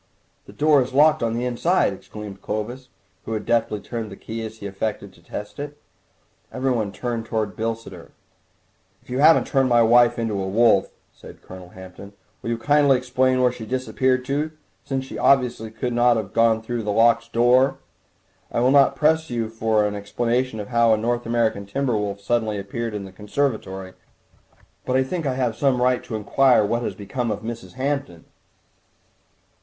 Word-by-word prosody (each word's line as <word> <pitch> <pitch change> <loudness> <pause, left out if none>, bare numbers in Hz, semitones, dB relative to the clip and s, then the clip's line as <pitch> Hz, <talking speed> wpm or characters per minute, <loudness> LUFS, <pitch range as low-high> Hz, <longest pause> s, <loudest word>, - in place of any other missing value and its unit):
"The - - -11
door 150 -2 +3
is 130 0 -4
locked 155 +2 +5
on 115 -1 0
the 120 +1 -2
inside!" 125 - +1
exclaimed 100 0 -10
Clovis, 120 +5 -5 0.4
who 115 - -4
had 110 - -3
deftly 115 -3 +1
turned 115 -1 -6
the - - -8
key 115 +3 -6
as 110 0 -7
he 100 - -10
affected 100 0 -4
to 85 - -21
test 105 +8 -8
it. 145 0 -6 0.7
Everyone 120 -6 -1
turned 115 +2 -4
towards 110 -3 -2
Bilsiter. 110 -6 -5 0.9
"If - - -14
you 125 - -1
haven't 160 +3 +6
turned 135 -2 +1
my 120 -1 +5
wife 120 +1 +5
into 110 -4 -2
a 95 - -3
wolf," 105 -1 +3 0.2
said - - -14
Colonel 90 -1 -11
Hampton, 95 +2 -12 0.3
"will - - -5
you 115 - -1
kindly 140 +3 +3
explain 130 0 +1
where 125 - +4
she 120 -2 -9
has 110 - -10
disappeared 130 0 0
to, 145 +3 -1 0.3
since 135 -1 -3
she - - -7
obviously 125 -4 +2
could 120 +3 -4
not 120 0 +4
have 100 -4 -5
gone 115 -1 +3
through 120 +1 -3
a 105 - -4
locked 115 +2 +3
door? 125 +3 +3 0.7
I - - -1
will 125 +2 +3
not 140 -1 +5
press 160 +2 +2
you 115 -2 -2
for 110 -1 +1
an 105 - -1
explanation 115 +4 -1
of 105 - -6
how 115 -1 +3
a 110 - +4
North 120 +2 -2
American 115 -4 0
timber 135 +2 -1
wolf 100 -1 -2
suddenly 110 0 0
appeared 110 +3 -4
in 100 -1 -5
the 95 - -11
conservatory, 100 -3 -3 0.9
but 125 - -1
I 130 - +4
think 160 +3 -3
I 130 - -1
have 125 -4 -1
some 135 0 +1
right 125 0 +2
to 110 - -5
inquire 125 +2 +3
what 115 +3 -1
has - - -3
become 115 +3 -4
of 105 -1 -3
Mrs. 115 0 -7
Hampton." 130 - -3
115 Hz, 185 wpm, -22 LUFS, 105-130 Hz, 0.9 s, haven't